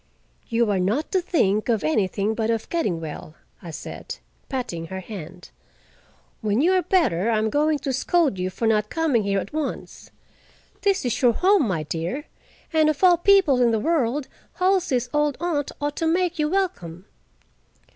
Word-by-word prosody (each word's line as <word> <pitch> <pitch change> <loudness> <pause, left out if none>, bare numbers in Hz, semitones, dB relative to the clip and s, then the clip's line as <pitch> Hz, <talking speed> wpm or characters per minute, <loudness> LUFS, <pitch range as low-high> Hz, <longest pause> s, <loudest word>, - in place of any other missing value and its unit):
"You 230 -2 +1
are 195 - +1
not 210 +12 -1
to 375 - +2
think 215 - +1
of 225 -7 +1
anything 195 +6 0
but 220 0 -2
of 225 -1 -1
getting 210 - -1
well," 155 -1 -8 0.3
I 175 - -9
said, 160 - -7 0.3
patting 240 - -4
her 190 +2 -6
hand. 180 -3 -10 0.9
"When 215 0 0
you 335 +6 +3
are 370 - +3
better, 315 - +1
I 225 - +2
am 215 0 0
going 300 +1 +2
to 275 -1 -3
scold 295 - +1
you 185 +1 -1
for 205 +5 -4
not 215 -1 +2
coming 315 -8 +1
here 200 -1 0
at 195 - -7
once. 310 -3 -5 0.7
This 395 -7 +1
is 245 - -1
your 245 -3 +5
home, 370 - +3
my 165 -6 -1
dear, 170 - -4 0.5
and 310 -1 +4
of 310 +3 -2
all 355 -2 +7
people 345 -8 +4
in 240 - +4
the 225 - +1
world, 285 -1 0 0.3
Halsey's 365 -10 +1
old 295 -1 +1
aunt 310 -4 -1
ought 290 0 -3
to 325 - 0
make 350 0 0
you 300 0 +1
welcome." 250 - -2
250 Hz, 175 wpm, -23 LUFS, 200-325 Hz, 0.9 s, all